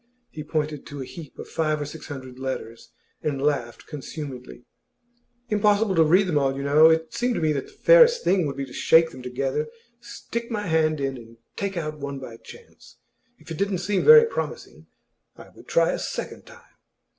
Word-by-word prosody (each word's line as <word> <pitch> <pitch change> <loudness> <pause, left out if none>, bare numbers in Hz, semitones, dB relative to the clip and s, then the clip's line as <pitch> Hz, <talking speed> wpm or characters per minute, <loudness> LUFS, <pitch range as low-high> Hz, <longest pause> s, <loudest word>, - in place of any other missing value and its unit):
He 155 - -7
pointed 150 -1 -3
to 140 -2 -7
a - - -8
heap 160 +1 -11
of - - -8
five 155 -1 -1
or 145 - -3
six 150 +2 -9
hundred 130 -3 -9
letters, 130 -4 -6 0.3
and 145 -3 -2
laughed 135 -5 -2
consumedly. 140 -4 -8 0.8
'Impossible 210 -1 +2
to 165 -2 +5
read 180 +6 +4
them 160 -5 +1
all, 135 -1 0
you 140 - -4
know. 150 +3 +6
It 160 0 0
seemed 245 0 0
to - - -1
me 155 -2 +1
that 140 - -4
the - - -18
fairest 485 -1 +5
thing 185 -5 +2
would 140 -1 -5
be 140 - -3
to 125 - -14
shake 165 0 +4
them 130 - -11
together, 135 +4 -2 0.3
stick 235 0 -6
my 210 -3 -3
hand 160 -3 +1
in, 135 -1 -2
and 115 -1 -14 0.2
take 195 -2 -3
out 155 -2 -4
one 140 -1 -5
by 120 -4 -9
chance. 470 - -16 0.4
If - - -15
it 160 - -5
didn't 200 -1 0
seem 190 +2 -1
very 460 0 +9
promising, 460 - -6 0.5
I - - -13
would - - -18
try - - +3
a - - -3
second - - -6
time. 480 -1 -16
155 Hz, 200 wpm, -24 LUFS, 140-195 Hz, 0.8 s, very